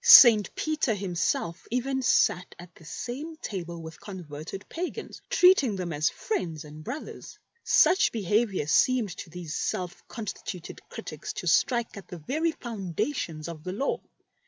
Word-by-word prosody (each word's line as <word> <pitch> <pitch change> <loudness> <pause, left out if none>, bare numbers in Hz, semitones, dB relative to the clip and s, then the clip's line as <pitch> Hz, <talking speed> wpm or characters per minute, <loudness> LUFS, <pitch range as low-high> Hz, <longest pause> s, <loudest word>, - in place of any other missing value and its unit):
St. 230 - +9
Peter 305 -7 0
himself 175 -2 -1
even 265 +3 0
sat 180 -6 +2
at 175 0 -12
the 165 - -17
same 250 - -5
table 175 - -5
with 160 0 -9
con 190 -3 -8
verted 155 +6 -8
pagans, 350 +2 -5
treating 360 - +5
them 180 -3 -3
as 150 +2 +2
friends 165 - -3
and 150 +1 -10
brothers. 255 - -7 0.3
Such 360 +5 +5
behaviour 210 -4 +1
seemed 235 - +3
to - - -7
these 165 -2 -6
self 180 +1 -2
consti 215 -4 -6 0.2
tuted 170 - -10
critics - - -6
to - - -5
strike 240 -3 +2
at 200 - -9
the 180 - -7
very 310 - 0
foundations 190 - -3
of 160 -3 -7
the 185 +1 -4
Law. 270 +8 -1
195 Hz, 155 wpm, -28 LUFS, 170-255 Hz, 0.3 s, St